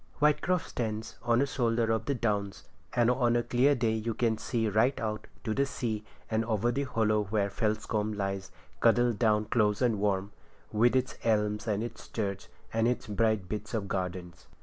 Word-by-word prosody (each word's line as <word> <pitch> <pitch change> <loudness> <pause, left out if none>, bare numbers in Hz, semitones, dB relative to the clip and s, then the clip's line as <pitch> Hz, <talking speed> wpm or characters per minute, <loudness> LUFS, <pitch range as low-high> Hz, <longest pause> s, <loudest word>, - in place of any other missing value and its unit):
Whitecroft 150 +4 +2
stands 110 -2 -4
on 120 +2 +3
a - - +2
shoulder 115 -4 +1
of 110 -1 0
the 140 - 0
Downs, 105 -4 -1 0.3
and 120 0 +4
on 120 -2 +2
a 120 - +2
clear 125 +5 +3
day 115 -3 +1
you 110 0 -2
can 115 -2 +1
see 115 -2 -1
right 110 +6 +2
out 110 -1 -3 0.2
to 115 +4 +1
sea 110 -6 -3 0.2
and 110 0 0
over 115 +1 +1
the 140 +3 -1
hollow 110 -4 +1
where 100 0 0
Felscombe 110 0 -1
lies 95 -1 -3 0.3
cuddled 120 -1 +3
down 110 -2 +3
close 105 -2 +2
and 120 -5 +2
warm, 100 -1 0 0.4
with 120 +4 +3
its 130 0 0
elms 105 -1 +1
and 105 0 0
its 120 - -7
church, 100 -3 -3 0.3
and 115 +1 +2
its 125 - -1
bright 110 -2 +1
bits 105 +3 -4
of 100 -3 -2
gardens. 90 -2 -4
110 Hz, 180 wpm, -30 LUFS, 105-120 Hz, 0.4 s, and